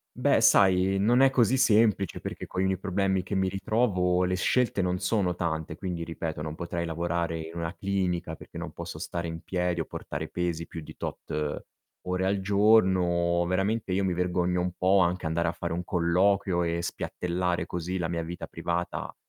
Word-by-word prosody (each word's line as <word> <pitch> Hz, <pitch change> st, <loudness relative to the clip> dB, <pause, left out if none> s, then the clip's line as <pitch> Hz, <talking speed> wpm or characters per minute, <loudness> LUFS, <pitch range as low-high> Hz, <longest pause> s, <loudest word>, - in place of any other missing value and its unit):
Beh, 125 Hz, -2 st, +3 dB
sai, 95 Hz, -2 st, +5 dB
non 120 Hz, +6 st, +4 dB
è 135 Hz, -, +7 dB
così 125 Hz, -2 st, +3 dB
semplice 105 Hz, -6 st, +3 dB
perché -, -, -6 dB
coi 95 Hz, +1 st, -1 dB
miei 95 Hz, -1 st, 0 dB
problemi 95 Hz, 0 st, 0 dB
che 95 Hz, -, -4 dB
mi 95 Hz, 0 st, +2 dB
ritrovo, 95 Hz, -2 st, +1 dB
le 90 Hz, 0 st, 0 dB
scelte 110 Hz, +1 st, +1 dB
non 90 Hz, 0 st, 0 dB
sono 100 Hz, -6 st, +1 dB
tante, 80 Hz, -2 st, -3 dB
quindi 90 Hz, -4 st, -4 dB
ripeto 80 Hz, -2 st, -4 dB
non 75 Hz, 0 st, -4 dB
potrei 85 Hz, 0 st, -3 dB
lavorare 85 Hz, 0 st, -1 dB
in 80 Hz, +1 st, -7 dB
una 85 Hz, +1 st, -3 dB
clinica, 90 Hz, -4 st, -1 dB
perché -, -, -12 dB
non -, -, -5 dB
posso -, -, -7 dB
stare 85 Hz, -1 st, -4 dB
in 80 Hz, 0 st, -6 dB
piedi 90 Hz, -2 st, -1 dB
o 80 Hz, -, -1 dB
portare 75 Hz, +2 st, -5 dB
pesi 85 Hz, -2 st, -2 dB
più 80 Hz, -, -7 dB
di -, -, -12 dB
tot 75 Hz, -1 st, -4 dB, 0.4 s
ore 90 Hz, +1 st, -1 dB
al 95 Hz, 0 st, +1 dB
giorno. 95 Hz, -4 st, +3 dB
Veramente 95 Hz, +2 st, 0 dB
io 100 Hz, -, +1 dB
mi 95 Hz, -2 st, +1 dB
vergogno 90 Hz, 0 st, 0 dB
un 90 Hz, 0 st, -1 dB
po' 95 Hz, +2 st, +4 dB
anche 90 Hz, 0 st, +1 dB
andare 85 Hz, +1 st, 0 dB
a 85 Hz, -, +1 dB
fare 85 Hz, 0 st, -4 dB
un 90 Hz, -, -2 dB
colloquio 90 Hz, 0 st, +2 dB
e 85 Hz, 0 st, -1 dB
spiattellare 90 Hz, 0 st, -2 dB
così 90 Hz, +2 st, -3 dB
la 85 Hz, -2 st, -2 dB
mia 85 Hz, -1 st, -2 dB
vita 85 Hz, +2 st, -6 dB
privata 85 Hz, 0 st, -3 dB
90 Hz, 185 wpm, -28 LUFS, 85-95 Hz, 0.4 s, è